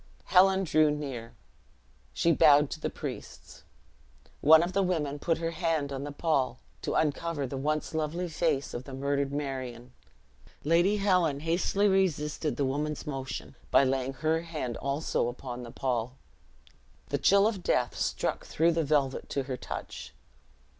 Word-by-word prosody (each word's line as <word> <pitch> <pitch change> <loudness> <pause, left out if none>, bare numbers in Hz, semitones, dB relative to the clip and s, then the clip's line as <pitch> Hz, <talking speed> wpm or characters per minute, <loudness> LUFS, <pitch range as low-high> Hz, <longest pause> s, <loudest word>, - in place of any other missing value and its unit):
Helen 190 +1 +5
drew 155 -3 +3
near 135 -6 -5 0.8
she 170 - +2
bowed 145 -2 +5
to - - -5
the - - -2
priests. - - -8 0.8
One 160 +2 +7
of 175 +2 -3
the 200 - +2
women 155 -6 -1
put 165 +2 0
her 165 0 -2
hand 155 -3 -1
on 135 +1 -4
the 145 - -5
pall, 145 -4 0 0.2
to - - -2
uncover 155 -1 0
the 135 - -5
once 150 +4 -2
lovely 160 +3 -2
face 155 -4 -1
of 120 +1 -5
the 135 - -7
murdered 140 0 -1
Marion. 130 -4 -5 0.7
Lady 175 +7 +3
Helen 180 -8 +2
hastily 175 +5 +1
resisted 160 -6 0
the 140 - +1
woman's 150 +3 -2
motion, 135 -2 -5 0.2
by - - +5
laying 135 0 0
her 155 +3 0
hand 155 -8 -4
also 140 -3 -1
upon 125 0 -6
the 120 - -8
pall. 125 0 -2 0.9
The - - -1
chill 200 +1 +5
of 210 -4 -2
death 125 -7 0
struck - - -1
through 165 +2 +2
the 165 0 0
velvet 140 -3 0
to 140 - -1
her 130 -1 -4
touch. 65 - -7
150 Hz, 155 wpm, -29 LUFS, 135-165 Hz, 0.9 s, One